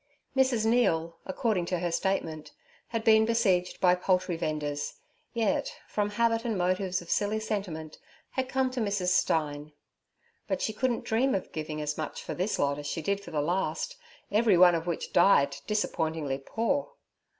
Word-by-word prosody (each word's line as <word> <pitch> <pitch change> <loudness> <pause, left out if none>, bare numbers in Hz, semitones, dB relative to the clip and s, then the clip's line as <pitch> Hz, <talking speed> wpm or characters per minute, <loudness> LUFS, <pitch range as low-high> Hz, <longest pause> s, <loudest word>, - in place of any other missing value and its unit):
Mrs. 260 -4 +3
Neal, 170 -9 +2
according 195 -3 0
to 180 - 0
her 175 0 -2
statement, 165 -4 -2 0.3
had 230 -1 -3
been 220 -1 +6
besieged 205 -6 +1
by 180 -1 +5
poultry 180 -1 +1
vendors, 150 -2 -3 0.4
yet, 225 -4 0
from 210 -1 -1
habit 230 +1 +1
and 230 -4 -1
motives 185 0 0
of 170 - -8
silly 210 +1 +1
sentiment, 185 -8 -4 0.3
had 260 -1 -2
come 260 -1 +1
to 255 - -3
Mrs. 200 -4 0
Stein. 150 -4 0 0.7
But - - -1
she 220 - -1
couldn't 240 +2 -1
dream 250 +5 +2
of 190 - -4
giving 155 -1 -4
as 150 +1 -3
much 155 - -4
for - - -4
this 185 +4 -1
lot 140 0 0
as 145 - -6
she 165 +2 -3
did 200 +4 0
for - - -9
the 150 -2 -1
last, 170 -1 -1 0.4
every 210 -2 +4
one 180 0 +7
of 165 0 -2
which 170 - -3
died 140 -6 +5
disappointingly 160 -9 -1
poor. 255 - -1
185 Hz, 170 wpm, -29 LUFS, 160-220 Hz, 0.7 s, one